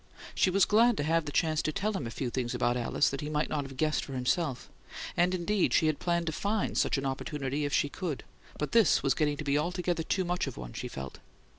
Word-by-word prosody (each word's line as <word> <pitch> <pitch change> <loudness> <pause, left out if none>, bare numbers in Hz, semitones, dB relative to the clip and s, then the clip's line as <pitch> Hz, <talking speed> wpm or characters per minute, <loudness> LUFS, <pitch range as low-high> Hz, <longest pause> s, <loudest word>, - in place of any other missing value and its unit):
She - - +3
was 195 +1 +4
glad 230 +1 +4
to - - 0
have 165 +1 +1
the 145 - -4
chance 155 +1 +1
to 155 - -1
tell 210 +7 -1
him 145 - -3
a - - -4
few 125 +1 -3
things 125 -1 -2
about 120 0 +1
Alice 125 +3 +1
he 150 - -4
might 150 0 0
not 145 -2 -1
have 135 -1 -10
guessed 155 +2 +1
for 135 - -7
himself, 130 +2 -1 0.5
and, 180 +2 +3
indeed, 185 +2 +1
she - - +4
had 155 -2 +1
planned 170 -1 0
to 160 - -1
find 205 +6 -1
such - - +2
an 135 - -2
opportunity, 135 +1 -2
if 145 - -2
she - - +3
could; 155 0 -4 0.3
but 150 - -3
this 230 -7 +4
was 135 -2 +3
getting 150 0 0
to 150 - -4
be 145 0 +2
altogether 175 +1 -1
too 185 +3 0
much 175 -3 -1
of 135 - -6
one, - - -7
she - - -5
felt. 65 -1 -7
150 Hz, 250 wpm, -30 LUFS, 135-175 Hz, 0.5 s, was